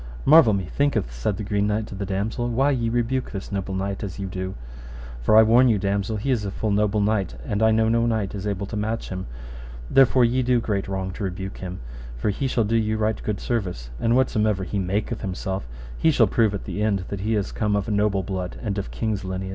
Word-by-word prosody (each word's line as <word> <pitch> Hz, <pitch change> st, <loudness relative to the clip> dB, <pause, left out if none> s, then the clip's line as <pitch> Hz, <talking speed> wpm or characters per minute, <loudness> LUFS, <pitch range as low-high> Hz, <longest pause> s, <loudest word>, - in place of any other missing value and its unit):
Marvel 145 Hz, -8 st, +7 dB
methinketh, 100 Hz, -, 0 dB
said -, -, -2 dB
the 105 Hz, -, -4 dB
Green 100 Hz, 0 st, 0 dB
Knight 105 Hz, +1 st, 0 dB
to -, -, -10 dB
the 100 Hz, 0 st, -4 dB
damosel, 110 Hz, +5 st, -2 dB
why 135 Hz, +5 st, +2 dB
ye 120 Hz, -4 st, 0 dB
rebuke 120 Hz, +2 st, 0 dB
this 100 Hz, 0 st, -7 dB
noble 95 Hz, -1 st, -3 dB
knight 95 Hz, +1 st, -3 dB
as 95 Hz, -4 st, -5 dB
ye 100 Hz, -, -4 dB
do, 95 Hz, 0 st, -4 dB, 0.7 s
for 110 Hz, -, +4 dB
I 110 Hz, -, +9 dB
warn 120 Hz, +4 st, +5 dB
you, 110 Hz, -, +3 dB
damosel, 100 Hz, +2 st, -1 dB
he 135 Hz, +7 st, -1 dB
is 120 Hz, -5 st, +1 dB
a 100 Hz, -, -2 dB
full 105 Hz, +2 st, -2 dB
noble 105 Hz, +1 st, +2 dB
knight, 100 Hz, -8 st, 0 dB
and 105 Hz, +1 st, -1 dB
I 110 Hz, -, +5 dB
know 110 Hz, 0 st, +3 dB
no 115 Hz, +1 st, +2 dB
knight 110 Hz, -4 st, -1 dB
is 100 Hz, 0 st, -4 dB
able 100 Hz, -1 st, -2 dB
to 105 Hz, -, -7 dB
match 110 Hz, +2 st, -2 dB
him; 95 Hz, -4 st, -5 dB, 0.6 s
therefore 130 Hz, -2 st, +5 dB
ye 125 Hz, +3 st, +1 dB
do 125 Hz, -1 st, +2 dB
great 100 Hz, -4 st, -2 dB
wrong 95 Hz, -1 st, -3 dB
to 100 Hz, -, -6 dB
rebuke 95 Hz, +1 st, -5 dB
him, 90 Hz, -1 st, -6 dB, 0.4 s
for -, -, 0 dB
he 135 Hz, +7 st, -2 dB
shall 120 Hz, -3 st, +1 dB
do 110 Hz, +2 st, +1 dB
you 110 Hz, -1 st, 0 dB
right 110 Hz, 0 st, 0 dB
good 105 Hz, -2 st, -2 dB
service, 90 Hz, -, -3 dB
for 115 Hz, -, 0 dB
whatsomever 110 Hz, -6 st, +2 dB
he 100 Hz, +2 st, -2 dB
maketh 100 Hz, +5 st, -2 dB
himself, 95 Hz, -, -4 dB, 0.3 s
ye 160 Hz, -, +5 dB
shall 130 Hz, -7 st, +5 dB
prove 105 Hz, 0 st, +2 dB
at 100 Hz, -, -5 dB
the 105 Hz, -, -4 dB
end 100 Hz, -4 st, +1 dB
that 100 Hz, -, -4 dB
he 110 Hz, +3 st, 0 dB
is 100 Hz, -2 st, -1 dB
come 105 Hz, -2 st, 0 dB
of 100 Hz, +2 st, -1 dB
a -, -, -2 dB
noble 100 Hz, -2 st, +1 dB
blood 90 Hz, -1 st, -4 dB
and 100 Hz, -3 st, -1 dB
of 100 Hz, -, -5 dB
king's 110 Hz, -3 st, -2 dB
lineage. 95 Hz, 0 st, -4 dB
105 Hz, 240 wpm, -24 LUFS, 95-115 Hz, 0.7 s, I